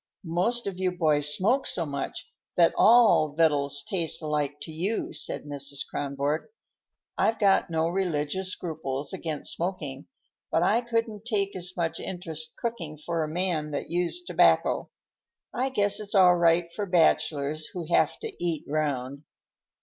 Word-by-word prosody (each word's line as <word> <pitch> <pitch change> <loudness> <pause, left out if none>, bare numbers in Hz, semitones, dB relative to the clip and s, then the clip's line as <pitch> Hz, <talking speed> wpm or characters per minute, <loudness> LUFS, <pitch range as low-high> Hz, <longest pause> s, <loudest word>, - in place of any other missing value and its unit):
"Most 185 +9 +1
of 195 -2 -4
you 185 -1 +1
boys 150 -4 +2
smoke 225 - +2
so 170 - 0
much 140 -2 -5 0.2
that 170 -1 +5
all 220 -10 +5
victuals 145 -3 +3
taste 170 -4 0
alike 150 -2 -1
to 160 - -7
you," 185 +8 -2
said 150 - 0
Mrs. 140 -1 -3
Kronborg. 140 +2 -2 0.7
"I've 225 - +2
got 200 -4 +3
no 160 0 0
religious 180 0 -1
scruples 150 -4 -3
against 160 -5 -3
smoking, 160 -6 -4 0.4
but - - +2
I 235 - +3
couldn't 230 -3 -2
take 200 -4 -1
as 180 0 -4
much 165 -2 -1
interest 160 -4 -6
cooking 170 -10 -4
for 165 +2 -3
a - - -3
man 165 -2 -1
that 145 +2 -5
used 180 - -1
tobacco. - - +3 0.6
I 260 +2 0
guess 205 -6 +2
it's 210 0 -3
all 180 -2 +7
right 170 0 +2
for 205 -1 -3
bachelors 155 -3 +2
who 175 -3 -6
have - - +3
to 450 -2 -5
eat 165 -4 -1
round." 140 -2 -2
170 Hz, 150 wpm, -27 LUFS, 150-190 Hz, 0.7 s, all